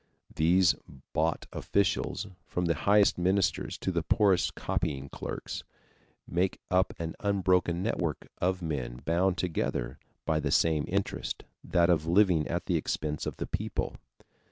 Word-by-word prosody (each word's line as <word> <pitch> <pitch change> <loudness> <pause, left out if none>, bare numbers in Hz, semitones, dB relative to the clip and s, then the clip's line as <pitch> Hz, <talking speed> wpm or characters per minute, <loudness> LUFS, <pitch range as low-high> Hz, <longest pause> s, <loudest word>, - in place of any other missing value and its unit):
These 85 +3 +5 0.4
bought 80 +1 0
officials, 100 -1 0 0.2
from 90 - -1
the 85 - +3
highest 100 +7 +4
ministers 95 +2 +1
to 95 - -2
the 85 -2 0
poorest 95 +1 +3
copying 70 -1 -2
clerks, - - -5 0.6
make 90 +2 0
up 95 0 +2
an 80 -1 -4
unbroken 90 -3 +2
network 90 -8 -2
of 90 0 0
men 65 -6 -3
bound 90 +3 +2
together 80 -9 -2 0.3
by 80 -1 +1
the 75 -2 -1
same 80 +1 +3
interest - - -2 0.2
that 85 -1 +3
of 80 -2 +1
living 90 -3 +4
at - - -2
the - - +1
expense 75 -1 -2
of - - -4
the - - -3
people. - - -3
85 Hz, 140 wpm, -29 LUFS, 80-95 Hz, 0.6 s, These